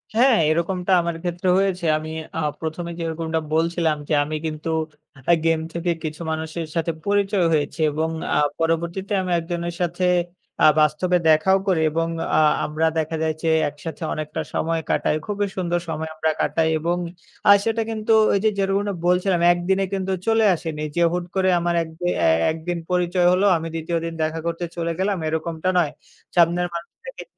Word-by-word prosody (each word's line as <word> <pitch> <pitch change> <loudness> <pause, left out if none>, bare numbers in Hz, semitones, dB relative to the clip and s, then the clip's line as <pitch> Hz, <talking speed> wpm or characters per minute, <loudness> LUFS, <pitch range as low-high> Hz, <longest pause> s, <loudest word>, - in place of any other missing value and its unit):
হ্যাঁ, 245 0 +5
এরকমটা 175 +3 0
আমার 170 0 -2
ক্ষেত্রে 175 +1 -1
হয়েছে। 190 -2 0
আমি 155 0 -6 0.3
আ - - 0 0.2
১ম 160 +2 -4
এ - - -6
যেরকমটা 165 -1 -2
বলছিলাম 165 -1 +1
যে - - +1
আমি 155 +2 -4
কিন্তু 155 +1 -4 0.6
আ - - +7
game 165 -1 +2
থেকে 170 +1 -1
কিছু 155 0 -5
মানুষের 160 +1 -4
সাথে 165 0 0
পরিচয় 200 -2 +2
হয়েছি 150 +2 -1
এবং 160 +2 -1 0.3
আ - - +3 0.2
পরবর্তীতে 170 +5 -1
আমি 185 -1 -3
একজনের 170 0 -4
সাথে 175 +1 0 0.6
আ - - +8
বাস্তবে 155 +4 +2
দেখাও 155 +5 +5
করি 180 -4 +2
এবং 165 +1 0 0.3
আ - - +5 0.2
আমরা 155 +2 0
দেখা 160 +1 -2
যায় 160 0 +1
যে 165 - +2 0.2
একসাথে 150 +2 -8
অনেকটা 155 -1 -4
সময় 165 0 0
কাটাই। - - +1
খুবই 205 -1 -1
সুন্দর 175 -1 0
সময় 160 0 -3
আমরা 160 0 +1
কাটাই 160 -1 +1
এবং 170 +3 0 0.5
আ - - +11
সেটা 225 0 0
কিন্তু 220 0 0 0.2
ওই 200 - +3
যে 220 - +5
যেরকমটা 200 +1 0
বলছিলাম 180 0 +2
একদিনে 190 +3 0
কিন্তু 190 -1 -2 0.2
চলে 225 -1 +4
আসেনি। 160 -2 -5
যে 170 - +1
হুট 175 0 -2
করে 190 -1 +2
আমার 170 0 0
একদি 160 +2 -8 0.2
এ - - +5 0.2
একদিন 165 +2 -4
পরিচয় 180 0 +2
হলো 185 +2 +3
আমি 165 0 -5
২য় 165 +1 -2
দিন 165 - -4
দেখা 160 +1 -2
করতে 170 +1 -2
চলে 170 -1 -2
গেলাম 195 +1 +1
এরকমটা 160 +2 -2
নয়। 170 -5 +2 0.4
সামনের 175 +1 +3
মানুষটাকে 170 - -8
170 Hz, 175 wpm, -22 LUFS, 160-185 Hz, 0.6 s, আ